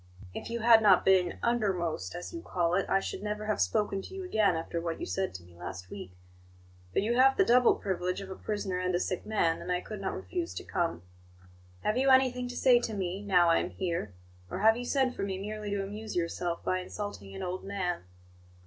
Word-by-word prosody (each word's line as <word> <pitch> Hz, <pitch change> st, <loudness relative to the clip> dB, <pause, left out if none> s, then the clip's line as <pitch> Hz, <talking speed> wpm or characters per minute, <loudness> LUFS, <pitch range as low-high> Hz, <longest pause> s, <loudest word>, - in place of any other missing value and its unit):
If -, -, -6 dB
you 235 Hz, 0 st, -3 dB
had 225 Hz, 0 st, +7 dB
not 200 Hz, -4 st, +5 dB
been 185 Hz, -2 st, +4 dB
'undermost,' 185 Hz, -, 0 dB
as 175 Hz, -, -6 dB
you 335 Hz, -, -5 dB
call 175 Hz, -, 0 dB
it, 195 Hz, +2 st, +1 dB
I 195 Hz, -, +4 dB
should 195 Hz, -, -5 dB
never 210 Hz, 0 st, -3 dB
have 215 Hz, -, 0 dB
spoken 195 Hz, -, +1 dB
to 385 Hz, -, -10 dB
you 385 Hz, -, -5 dB
again 215 Hz, -, +2 dB
after 165 Hz, +1 st, -3 dB
what 165 Hz, -1 st, -3 dB
you -, -, -3 dB
said 95 Hz, +1 st, -1 dB
to 90 Hz, -, -8 dB
me 85 Hz, 0 st, -18 dB
last 90 Hz, +1 st, -8 dB
week; 90 Hz, 0 st, -9 dB, 0.7 s
but 90 Hz, -, +1 dB
you 235 Hz, +3 st, +1 dB
have 265 Hz, +1 st, +5 dB
the 385 Hz, -, +5 dB
double 250 Hz, -4 st, +5 dB
privilege 180 Hz, -2 st, -2 dB
of 195 Hz, -1 st, -8 dB
a -, -, -5 dB
prisoner 200 Hz, -3 st, -3 dB
and 180 Hz, -1 st, 0 dB
a -, -, +2 dB
sick 185 Hz, -1 st, -3 dB
man, 170 Hz, -7 st, +1 dB
and 180 Hz, -, -4 dB
I 180 Hz, -, +1 dB
could 210 Hz, +2 st, -7 dB
not 190 Hz, -, -2 dB
refuse 350 Hz, -2 st, -4 dB
to -, -, -5 dB
come. 170 Hz, -, -2 dB, 0.8 s
Have 215 Hz, -, +1 dB
you 270 Hz, +1 st, +3 dB
anything 255 Hz, -1 st, +4 dB
to 245 Hz, -, -6 dB
say 250 Hz, -2 st, +6 dB
to 225 Hz, -2 st, -3 dB
me, 190 Hz, 0 st, -3 dB
now 180 Hz, -4 st, +4 dB
I 165 Hz, -, +4 dB
am -, -, -2 dB
here; 170 Hz, -, -3 dB, 0.3 s
or 190 Hz, -, -4 dB
have 220 Hz, +1 st, +6 dB
you 245 Hz, +1 st, -5 dB
sent 260 Hz, -1 st, +1 dB
for -, -, -5 dB
me 195 Hz, -1 st, -2 dB
merely 210 Hz, +1 st, -5 dB
to 200 Hz, -1 st, -1 dB
amuse 210 Hz, +3 st, -6 dB
yourself 170 Hz, 0 st, -2 dB
by 185 Hz, -, 0 dB
insulting 180 Hz, -, -6 dB
an -, -, -5 dB
old 185 Hz, +1 st, -4 dB
man?" 190 Hz, -3 st, -2 dB
195 Hz, 230 wpm, -30 LUFS, 175-220 Hz, 0.8 s, had